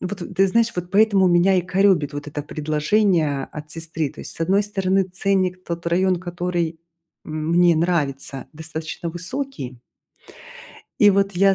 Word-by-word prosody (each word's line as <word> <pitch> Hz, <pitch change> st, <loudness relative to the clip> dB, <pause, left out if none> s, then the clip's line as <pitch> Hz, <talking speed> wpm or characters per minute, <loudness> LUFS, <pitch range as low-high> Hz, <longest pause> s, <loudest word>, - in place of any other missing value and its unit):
Вот, 185 Hz, +1 st, -5 dB, 0.2 s
ты 195 Hz, 0 st, +4 dB
знаешь, 230 Hz, +3 st, +2 dB
вот 180 Hz, 0 st, -4 dB
поэтому 200 Hz, -1 st, +4 dB
меня 180 Hz, +2 st, +4 dB
и -, -, +4 dB
коробит 180 Hz, -5 st, +2 dB
вот 145 Hz, 0 st, -6 dB
это 150 Hz, 0 st, -5 dB
предложение 155 Hz, 0 st, +1 dB
от 150 Hz, 0 st, -8 dB
сестры. 165 Hz, -1 st, -3 dB
То -, -, -12 dB
есть, -, -, -9 dB
с -, -, -15 dB
одной 195 Hz, +5 st, +3 dB
стороны, 195 Hz, -2 st, +1 dB
ценник, 185 Hz, 0 st, 0 dB
тот 170 Hz, 0 st, -5 dB
район, 185 Hz, +2 st, +2 dB
который, 175 Hz, -2 st, -3 dB, 0.5 s
м, 155 Hz, 0 st, -4 dB
мне 175 Hz, -1 st, +5 dB
нравится, 145 Hz, -5 st, -1 dB
достаточно 160 Hz, +2 st, -6 dB
высокий. 175 Hz, -, -5 dB, 1.2 s
И 205 Hz, -1 st, +8 dB
вот 195 Hz, 0 st, +2 dB
я, 195 Hz, +2 st, +4 dB
175 Hz, 155 wpm, -22 LUFS, 155-195 Hz, 1.2 s, И